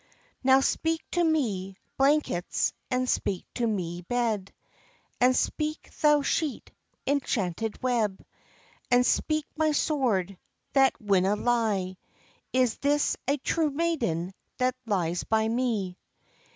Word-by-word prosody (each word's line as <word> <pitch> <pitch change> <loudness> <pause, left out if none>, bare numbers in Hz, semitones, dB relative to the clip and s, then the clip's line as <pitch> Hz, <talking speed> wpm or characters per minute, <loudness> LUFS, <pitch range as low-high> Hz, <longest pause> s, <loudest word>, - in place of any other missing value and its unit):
"Now 265 +1 +6
speak 325 +3 0
to 350 - +2
me, 210 - 0 0.2
blankets, 275 - +1 0.2
and 255 0 0
speak 190 -6 -1
to 240 -2 0
me, 175 -5 -2
bed, 220 -1 -1 0.7
And 255 +1 +4
speak, 310 0 -2
thou 295 -1 +5
sheet, 305 -1 -1 0.3
enchanted 225 -7 -1
web; 225 -6 0 0.6
And 245 0 +4
speak, 310 +2 +1
my 310 -1 +2
sword, 220 - 0 0.3
that 270 -1 +4
winna 200 -2 +2
lie, 210 -6 0 0.5
Is 255 -4 +2
this 290 +1 +1
a 280 +2 +2
true 310 +3 0
maiden 250 - -1 0.2
that 255 0 +1
lies 175 -5 0
by 220 0 +1
me?" 225 -6 -1
245 Hz, 115 wpm, -27 LUFS, 195-285 Hz, 0.7 s, Now